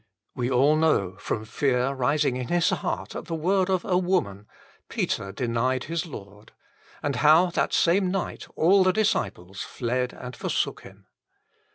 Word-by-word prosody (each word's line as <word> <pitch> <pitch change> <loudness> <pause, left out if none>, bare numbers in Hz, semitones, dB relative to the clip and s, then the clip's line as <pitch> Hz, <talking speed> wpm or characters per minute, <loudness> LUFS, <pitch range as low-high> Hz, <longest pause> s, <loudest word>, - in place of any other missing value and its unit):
We 125 -1 -2
all 135 +4 +4
know 155 - +2
how, 95 - -21
from 110 - -3
fear 130 +2 0
rising 135 0 +1
in 125 -1 -4
his 175 -1 +2
heart - - -3
at - - -5
the 165 - -4
word 185 +4 +1
of 185 -2 0
a 180 -1 +2
woman, 155 - -1 0.4
Peter 100 - -2
denied 125 +4 -1
his 165 +2 -3
Lord; 105 -6 -11 0.5
and 140 -3 -1
how 155 +7 +5
that - - 0
same 180 +2 +3
night 195 0 -3
all 190 +4 +5
the 185 0 +3
disciples 100 - -1
fled 125 +1 -2
and 125 0 -9
forsook - - -2
Him. - - -15
140 Hz, 165 wpm, -25 LUFS, 120-175 Hz, 0.5 s, how